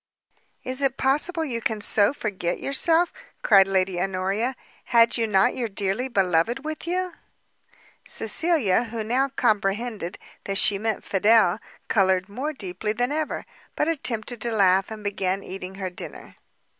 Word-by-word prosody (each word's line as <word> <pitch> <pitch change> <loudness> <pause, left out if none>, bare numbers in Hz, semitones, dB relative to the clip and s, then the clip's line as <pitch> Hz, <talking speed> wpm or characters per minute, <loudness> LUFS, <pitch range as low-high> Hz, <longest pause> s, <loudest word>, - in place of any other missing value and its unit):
"Is 255 +2 -3
it 270 -1 0
possible 310 +5 +2
you 235 -5 -3
can 220 -1 -1
so 205 0 +2
forget 190 -10 -3
yourself?" 325 +5 +3 0.3
cried 195 -3 +6
Lady 190 -2 0
Honoria; 195 +6 -1 0.3
"had 235 -1 +4
you 230 -2 0
not 210 +4 +3
your 240 -2 -2
dearly 200 +4 -2
beloved 195 - +1
with 310 +1 -5
you?" 365 +1 -1 1.0
Cecilia, 270 - +1
who 225 -1 -5
now 255 +5 +1
comprehended 215 -5 -1 0.3
that 195 0 0
she 200 -1 +3
meant 220 0 -2
Fidel, 205 -1 +3 0.3
coloured 190 -2 +2
more 265 +9 -3
deeply 210 - -4
than 245 +4 -1
ever, 310 0 -2 0.3
but 300 - 0
attempted 245 -7 -2
to 235 - +1
laugh, 195 -3 +3
and 215 -1 -8
began 195 -1 -2
eating 190 0 -7
her 190 -2 -4
dinner. 180 - -10
220 Hz, 145 wpm, -24 LUFS, 195-255 Hz, 1.0 s, cried